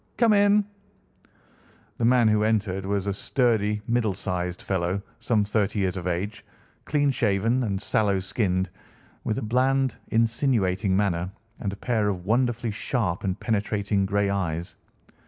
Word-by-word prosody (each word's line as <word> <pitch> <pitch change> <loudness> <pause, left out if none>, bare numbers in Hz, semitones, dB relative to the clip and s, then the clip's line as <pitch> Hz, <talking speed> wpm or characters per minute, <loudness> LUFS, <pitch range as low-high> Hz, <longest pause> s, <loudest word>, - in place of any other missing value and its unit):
Come 230 -3 +5
in!" 205 0 +4 1.3
The 115 - +2
man 120 -1 +5
who 105 -1 +3
entered 100 -3 0
was 100 -1 0
a 100 - 0
sturdy, 105 -2 +1
middle 115 -4 +1
sized 90 0 -3
fellow, 95 +1 -1 0.2
some 115 -3 +1
thirty 105 0 0
years 95 -2 0
of 90 -1 -4
age, 100 +4 -3 0.4
clean 145 -1 +2
shaven, 115 +1 +1
and 100 -5 -1
sallow 100 -1 +1
skinned, 95 -1 -1 0.5
with 110 - -1
a - - -3
bland, 130 +3 +1
insinuating 110 -5 +1
manner, 90 -3 0 0.3
and 100 - -2
a - - -6
pair 110 -1 0
of 90 -3 -4
wonderfully 120 +1 +1
sharp 100 -4 -2
and 95 -1 -2
penetrating 100 -2 0
grey 100 0 +1
eyes. 85 -4 -2
105 Hz, 145 wpm, -25 LUFS, 95-115 Hz, 1.3 s, Come